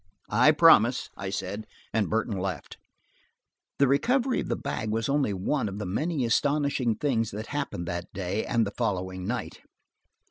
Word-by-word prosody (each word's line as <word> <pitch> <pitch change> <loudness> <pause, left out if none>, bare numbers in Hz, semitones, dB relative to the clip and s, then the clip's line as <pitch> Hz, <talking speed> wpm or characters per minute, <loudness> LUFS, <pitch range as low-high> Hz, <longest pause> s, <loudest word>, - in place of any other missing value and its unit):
"I 125 +7 +6
promise," 145 -6 +5
I 95 - -5
said, 100 +2 -4 0.3
and 110 -3 +1
Burton 110 -1 0
left. 90 -4 -4 1.0
The 140 - +4
recovery 250 - +2
of - - -3
the - - +1
bag 110 - -4
was 110 +1 -1
only 140 -5 +1
one 100 +5 -1
of 100 - -7
the 105 - -4
many 140 - -1
astonishing 140 -1 +1
things 115 -4 0
that 105 +2 -6
happened 140 -12 -3
that 85 0 -4
day 95 +3 -2
and 115 -1 +1
the 100 - -4
following 95 -5 -2
night. 120 +2 -4
110 Hz, 165 wpm, -27 LUFS, 100-140 Hz, 1.0 s, I